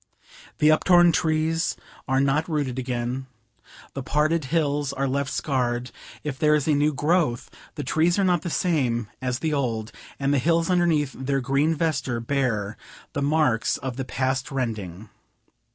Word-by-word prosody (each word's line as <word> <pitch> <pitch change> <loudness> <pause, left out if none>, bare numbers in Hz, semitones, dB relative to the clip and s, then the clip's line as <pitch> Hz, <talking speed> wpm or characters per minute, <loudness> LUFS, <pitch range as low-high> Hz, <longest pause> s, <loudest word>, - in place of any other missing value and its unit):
The 150 - +4
uptorn 175 +2 +5
trees 160 +1 +1 0.3
are 135 0 +2
not 140 +4 +1
rooted 140 -5 -1
again; 125 +1 -3 0.7
the 135 - -4
parted 150 +3 +1
hills 145 -1 0
are 140 0 -1
left 140 +1 -1
scarred; 125 -3 -1 0.3
if 145 -3 -4
there 150 0 +4
is 150 -1 -1
a 155 - +4
new 145 +1 +3
growth, 150 -3 0 0.2
the 145 - -4
trees 160 +6 +2
are 200 - +2
not 180 -3 +2
the 175 - -4
same 130 - 0
as 125 -1 -1
the 155 +3 -1
old, 115 -6 -1 0.3
and 140 0 +1
the 140 - +3
hills 165 +5 +2
underneath 165 -6 +2
their 135 +1 -1
green 140 +5 +1
vesture 135 -7 -1
bear 115 -5 -1 0.4
the 145 - -2
marks 140 -5 +2
of 130 -2 -5
the 135 - -3
past 130 +1 -1
rending. 110 -7 -4
140 Hz, 160 wpm, -24 LUFS, 125-155 Hz, 0.7 s, uptorn